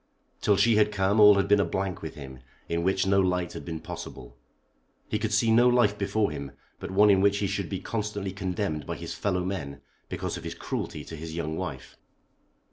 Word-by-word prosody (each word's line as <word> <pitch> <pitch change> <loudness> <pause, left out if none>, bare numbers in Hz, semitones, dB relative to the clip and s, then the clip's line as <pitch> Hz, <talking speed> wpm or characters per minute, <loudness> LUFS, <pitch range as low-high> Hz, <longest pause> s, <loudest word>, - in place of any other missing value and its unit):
Till 100 -2 +3
she 110 +2 +4
had 105 0 +4
come 100 +1 +1
all 105 -1 +9
had 100 - +1
been 105 0 +5
a - - +4
blank 95 -2 -3
with 80 - -7
him, 65 -3 -9 0.3
in 85 0 -1
which 95 +2 +1
no 95 0 +3
light 90 -1 0
had - - -7
been 80 -2 -5
possible. - - -9 0.7
He 105 - -1
could 110 0 -2
see 110 +2 +3
no 120 +2 +6
life 120 -4 +3
before 105 0 0
him 70 -2 -6 0.3
but - - -6
one 100 +2 +5
in 95 -1 +4
which 100 0 +3
he 100 - -1
should 100 -2 -2
be 95 - -3
constantly 105 -3 -3
condemned 90 -4 -3
by - - -3
his - - -6
fellow 90 -3 -1
men 70 -8 -4 0.3
because - - -3
of - - -9
his - - -5
cruelty - - -5
to 80 - -8
his 80 +1 -7
young 80 -2 -3
wife. 80 -8 -6
95 Hz, 215 wpm, -27 LUFS, 85-105 Hz, 0.7 s, all